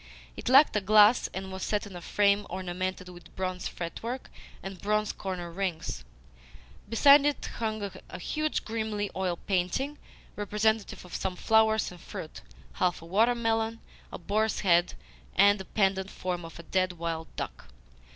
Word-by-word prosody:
It - - -4
lacked 275 +1 +7
a 210 - +2
glass, 210 +3 +6
and 190 0 -6
was 190 0 -6
set 210 0 -1
in 200 -3 -10
a 175 - -7
frame 200 +3 +2
ornamented 185 0 -4
with 175 -2 -14
bronze 185 -1 -3
fretwork 230 +9 -5 0.3
and 190 -2 -7
bronze 210 +1 +1
corner 180 -3 -5
rings. 170 - -3 0.9
Beside 280 +5 +7
it 290 0 0
hung 215 -2 -2 0.2
a - - -7
huge, 305 - -2
grimy 220 -2 -2
oil 185 -2 -1
painting 200 - -1 0.4
representative 210 0 0
of 180 - -13
some 185 -1 -2
flowers 220 +1 +3
and 175 -2 -12
fruit, 155 - -8 0.3
half 175 -3 0
a - - -10
water 220 +8 +3
melon, 225 -1 0 0.3
a - - -5
boar's 215 +5 0
head, 175 -2 +3 0.4
and 200 +1 +6
the 190 - -6
pendent 195 -1 +1
form 180 -3 -4
of 165 - -10
a 170 - -9
dead 185 +2 0
wild 165 -1 -4
duck. - - -6
195 Hz, 160 wpm, -29 LUFS, 180-220 Hz, 0.9 s, lacked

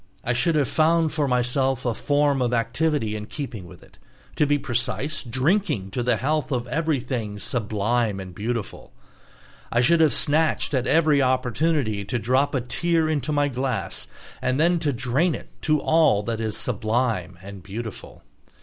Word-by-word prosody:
I 125 - 0
should 125 +7 +1
have 145 -4 +2
found 160 0 +2
for 150 -2 0
myself 130 +1 0
a 120 - +1
form 145 +2 +1
of 125 -1 +1
activity 115 0 0
in 105 0 -6
keeping 115 - -6
with - - -14
it, - - -21 0.4
to 150 - +2
be 145 0 +3
precise, 125 +3 -1
drinking 130 - 0
to 125 - -2
the 120 -1 +1
health 150 +4 -1
of 125 -2 -1
everything 130 -8 -2
"sublime 110 0 -1
and 95 -1 -8
beautiful." 115 +3 -5 0.8
I 120 - +3
should 165 +6 +4
have 155 - +5
snatched 155 +1 +2
at 130 -2 0
every 155 -3 +4
opportunity 130 -3 0
to 120 - -2
drop 130 +5 +1
a 130 - +1
tear 165 +6 0
into 155 -1 -1
my 145 -1 +2
glass 130 -1 -3 0.3
and 130 +2 0
then 170 +2 +3
to 150 -3 0
drain 130 +7 0
it - - -10
to 155 -1 +2
all 155 -10 +3
that 115 +1 -3
is 110 -2 -2
"sublime 110 -5 -1
and 100 +1 -10
beautiful." 110 +3 -8
130 Hz, 165 wpm, -24 LUFS, 115-150 Hz, 0.8 s, have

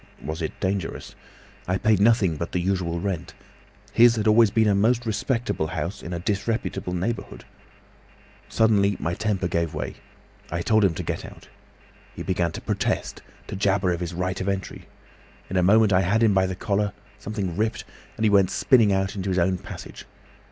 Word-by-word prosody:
Was 80 +3 -4
it 80 - -4
dangerous? 95 -2 -3 0.5
I 90 +1 +1
paid 105 +1 +2
nothing 105 -5 +3
but 85 +3 -5
the 90 - +1
usual 90 -2 -1
rent. 85 -2 -4 0.6
His 120 0 +6
had 110 -1 -2
always 110 0 +6
been 110 +1 +2
a 105 - +4
most 115 +4 +2
respectable 115 - -1
house—in 85 +2 -5
a 85 - -2
disreputable 105 0 -2
neighbourhood. 105 +7 -4 1.0
Suddenly 100 -3 +3
my 85 - -2
temper 95 -1 -1
gave 85 -2 -1
way. 75 - -5 0.5
I 85 +1 -3
told 110 +2 +3
him 95 -5 +2
to - - -4
get - - -3
out. - - -12 0.7
He - - -6
began 90 -3 0
to - - -6
protest, - - -2 0.2
to - - -6
jabber 95 -1 +1
of 85 - -2
his 85 -1 -4
right 95 +2 -2
of 95 - -1
entry. 95 -1 -4 0.6
In - - -3
a 90 - +3
moment 105 +3 +5
I 90 - +4
had 100 +6 +2
him 110 -3 +4
by 95 -1 +3
the 95 - -4
collar; 105 -1 -1 0.3
something 100 -5 -4
ripped, 110 +4 -1 0.3
and 110 - -2
he 110 - +5
went 100 -2 +4
spinning 115 -6 +4
out 95 +1 0
into 100 -1 -3
his 95 - 0
own 90 +1 +1
passage. 100 -2 -9
95 Hz, 185 wpm, -24 LUFS, 90-110 Hz, 1.0 s, His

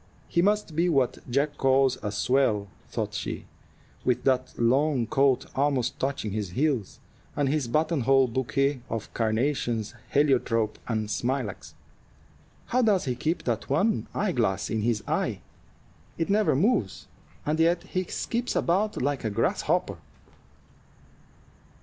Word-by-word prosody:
"He 170 - +2
must 205 -4 +1
be 170 +3 +2
what 135 -6 +1
Jack 145 +4 0
calls 135 -1 +3
a 105 - -3
swell," 110 -2 +1 0.2
thought - - -3
she, - - -4 0.6
"with 125 -2 +1
that 130 -1 +1
long 130 +2 +2
coat 135 +2 +2
almost 135 -3 0
touching 135 -6 -2
his 105 -2 -3
heels, 130 - -1 0.4
and 145 -1 +1
his 140 -2 0
button 155 +4 +1
hole 135 +1 +4
bouquet 130 +2 0
of 110 -2 -5
carnations, 115 -1 0 0.2
heliotrope, 125 -6 +2
and 110 -2 -1
smilax. 120 -1 -3 0.9
How 255 - +1
does 210 -7 +3
he 130 - 0
keep 155 +7 -2
that 115 -3 -2
one 195 +10 +1
eyeglass 120 - 0
in 110 - 0
his 110 -1 0
eye? - - -1 0.8
It 165 +3 -1
never 210 -7 +3
moves, 145 - +1 0.4
and 155 +2 0
yet 170 +1 +3
he 185 -1 -2
skips 235 +7 -2
about 200 +5 +1
like 140 +1 -1
a 110 - 0
grasshopper." 100 - 0
135 Hz, 135 wpm, -27 LUFS, 115-155 Hz, 0.9 s, hole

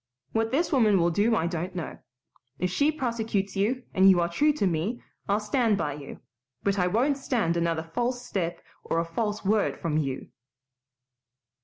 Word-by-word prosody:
What 225 0 +1
this 320 +7 0
woman 220 -8 +4
will 170 -1 +3
do 215 +6 +2
I 165 - +1
don't 175 +2 -3
know. 170 -4 -5 0.6
If 180 -1 -1
she 285 +11 +3
prosecutes 225 -8 -2
you, 235 +6 0
and 190 +1 +6
you 185 -2 +6
are 170 - +2
true 295 - +3
to 280 - 0
me, 185 +7 -1 0.3
I'll 200 +1 +3
stand 215 0 +1
by 150 -6 -1
you, 140 -1 -9 0.4
but 200 0 +1
I 180 - +3
won't 260 +9 +1
stand 225 -11 0
another 165 -1 0
false 245 +8 -2
step 175 -5 -3 0.2
or - - -1
a 165 - +1
false 210 +5 -3
word 210 +1 +2
from 155 -2 -1
you." 135 -3 -3
200 Hz, 180 wpm, -27 LUFS, 170-235 Hz, 0.6 s, and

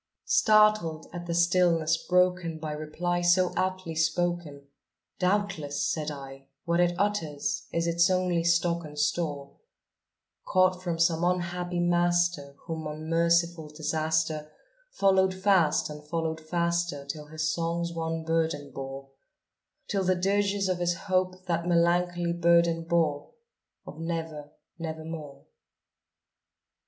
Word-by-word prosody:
Startled 215 - +3
at 175 0 -6
the 170 - -1
stillness 170 -2 +3
broken 180 -1 +1
by 155 -1 -5
reply 155 +4 -2
so 175 +1 +3
aptly 185 -2 -2
spoken, 165 -2 -1 0.6
"Doubtless," 180 -7 0
said 155 -1 -2
I, 135 -2 -9 0.2
"what 170 0 +1
it 175 0 +3
utters 205 +1 -1
is 170 0 0
its 170 +1 +3
only 180 -2 +1
stock 170 0 +2
and 150 -1 -10
store, 150 -2 -2 0.9
Caught 185 -1 +2
from 175 -2 -2
some 165 0 +2
unhappy 180 0 -1
master 175 -4 +1
whom 160 -2 -4
unmerciful 165 +1 0
Disaster 155 0 -1 0.4
Followed 190 - +2
fast 190 -5 +3
and 150 0 -9
followed 160 +1 -3
faster 170 -3 -1
till 150 +1 -6
his 155 +1 -2
songs 170 0 -2
one 165 0 -3
burden 160 -3 -1
bore 135 0 -7 0.8
Till 195 -1 0
the 185 0 +2
dirges 200 +1 +1
of 185 -1 -1
his 175 0 +1 0.2
Hope 185 0 0
that 170 -1 -1
melancholy 175 0 +2
burden 170 -1 +3
bore 160 -4 0 0.5
Of 150 - -10
'Never 160 -3 -4 0.3
nevermore.'" 160 -3 -7
170 Hz, 120 wpm, -28 LUFS, 155-180 Hz, 0.9 s, Startled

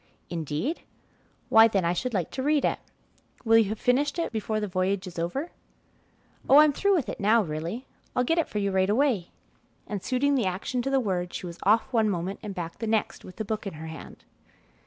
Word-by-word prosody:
"Indeed? 165 - -3 0.7
Why, 225 0 +8
then, 195 -5 0
I 170 - +2
should 250 +8 -2
like 180 -4 -1
to 265 - -4
read 295 0 +2
it. - - 0 0.7
Will 225 0 +6
you 215 -3 +2
have 215 0 -4
finished 280 +5 +1
with 335 - 0
it - - -7
before 220 -1 -2
the 210 - -2
voyage 185 +1 -1
is 180 -2 -7
over?" 265 - -3 1.0
"Oh, 275 - +8
I'm 300 -1 +7
through 400 +6 +2
with 310 -9 0
it - - -5
now 215 +3 +4
really. 165 - -4 0.3
I'll 250 - +2
get 330 +7 +1
it 330 - 0
for - - -4
you 200 -1 0
right 190 0 +2
away," 225 -6 +1 0.6
and 205 -2 -4
suiting 270 +5 +1
the 255 -6 +1
action 195 +7 -2
to 270 - -2
the 270 0 +3
word, 180 -6 -2
she - - -5
was 170 -1 -8
off 220 +6 +2
one 220 -2 +3
moment 185 +1 -3
and 205 -3 -6
back 170 -2 -6
the 225 - -3
next 220 -1 -1
with 185 - -11
the 220 - -4
book 215 0 -3
in 195 - -5
her 160 +1 -8
hand. 160 -2 -10
215 Hz, 225 wpm, -27 LUFS, 185-255 Hz, 1.0 s, Why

